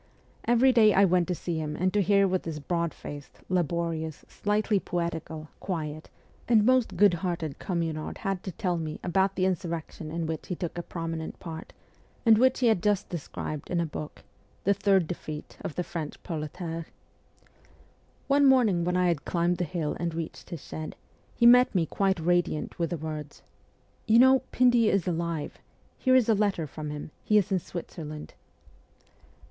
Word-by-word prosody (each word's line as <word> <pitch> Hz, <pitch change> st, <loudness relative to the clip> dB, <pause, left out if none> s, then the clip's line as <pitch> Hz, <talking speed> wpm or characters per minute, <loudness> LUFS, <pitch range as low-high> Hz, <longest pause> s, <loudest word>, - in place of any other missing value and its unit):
Every 240 Hz, +3 st, +5 dB
day 215 Hz, -3 st, +6 dB
I 195 Hz, +1 st, +6 dB
went 180 Hz, -1 st, +2 dB
to 180 Hz, -, -1 dB
see 165 Hz, 0 st, -3 dB
him 150 Hz, -1 st, -3 dB
and 185 Hz, +3 st, 0 dB
to 205 Hz, -, +3 dB
hear 200 Hz, +1 st, +4 dB
what 185 Hz, 0 st, 0 dB
this 160 Hz, -2 st, -5 dB
broad 170 Hz, +2 st, -1 dB
faced, 145 Hz, -1 st, -10 dB
laborious, 170 Hz, -3 st, -1 dB
slightly 210 Hz, 0 st, 0 dB
poetical, 165 Hz, -3 st, -4 dB
quiet, 155 Hz, -4 st, -4 dB, 0.4 s
and 220 Hz, -3 st, +5 dB
most 255 Hz, -1 st, +3 dB
good 205 Hz, -3 st, +6 dB
hearted 170 Hz, -4 st, -3 dB
Communard 165 Hz, -4 st, -3 dB
had 195 Hz, -3 st, -2 dB
to 190 Hz, -, -3 dB
tell 180 Hz, 0 st, -1 dB
me 155 Hz, -2 st, -4 dB
about 190 Hz, +2 st, +1 dB
the 185 Hz, -, +1 dB
insurrection 170 Hz, -4 st, -3 dB
in 165 Hz, +1 st, -3 dB
which 160 Hz, -1 st, -4 dB
he 180 Hz, -, -2 dB
took 170 Hz, -1 st, -4 dB
a 175 Hz, -, -3 dB
prominent 165 Hz, -2 st, -5 dB
part, 165 Hz, -2 st, -8 dB, 0.5 s
and 220 Hz, -2 st, +7 dB
which 260 Hz, +1 st, +3 dB
he -, -, +3 dB
had 220 Hz, -6 st, +4 dB
just 205 Hz, 0 st, +1 dB
described 155 Hz, -3 st, -5 dB
in 175 Hz, -, 0 dB
a 170 Hz, -, +1 dB
book, 155 Hz, -1 st, -7 dB, 0.2 s
' -, -, -35 dB
The 200 Hz, -, +4 dB
Third 195 Hz, -2 st, +3 dB
Defeat 155 Hz, -3 st, -7 dB
of 150 Hz, -, -5 dB
the 180 Hz, -, -1 dB
French 165 Hz, -4 st, -6 dB
Proletariate.' 165 Hz, +1 st, -5 dB, 1.4 s
One 280 Hz, 0 st, +4 dB
morning 225 Hz, -10 st, +4 dB
when 180 Hz, +1 st, 0 dB
I 180 Hz, 0 st, +3 dB
had 170 Hz, -4 st, 0 dB
climbed 175 Hz, 0 st, 0 dB
the 175 Hz, -, +1 dB
hill 160 Hz, -2 st, -2 dB
and 170 Hz, -1 st, -2 dB
reached 165 Hz, -1 st, -6 dB
his 165 Hz, -5 st, -7 dB
shed, 155 Hz, 0 st, -6 dB, 0.4 s
he 235 Hz, -, +2 dB
met 250 Hz, -1 st, +7 dB
me 170 Hz, -3 st, +3 dB
quite 195 Hz, +2 st, 0 dB
radiant 175 Hz, -1 st, 0 dB
with 170 Hz, -2 st, 0 dB
the 175 Hz, -, -2 dB
words: 155 Hz, -1 st, -6 dB, 0.3 s
' -, -, -37 dB
You 220 Hz, +1 st, +6 dB
know, 260 Hz, +2 st, +7 dB
Pindy 245 Hz, -3 st, +4 dB
is 195 Hz, -3 st, +1 dB
alive! 170 Hz, -3 st, -2 dB, 0.4 s
Here 255 Hz, -1 st, +4 dB
is 255 Hz, -4 st, +5 dB
a 225 Hz, -, +5 dB
letter 200 Hz, -5 st, +1 dB
from 150 Hz, +1 st, -6 dB
him; 150 Hz, +1 st, -6 dB
he 210 Hz, -, +3 dB
is 200 Hz, -2 st, +2 dB
in 190 Hz, -, +3 dB
Switzerland.' 155 Hz, -3 st, -7 dB
175 Hz, 185 wpm, -28 LUFS, 160-200 Hz, 1.4 s, and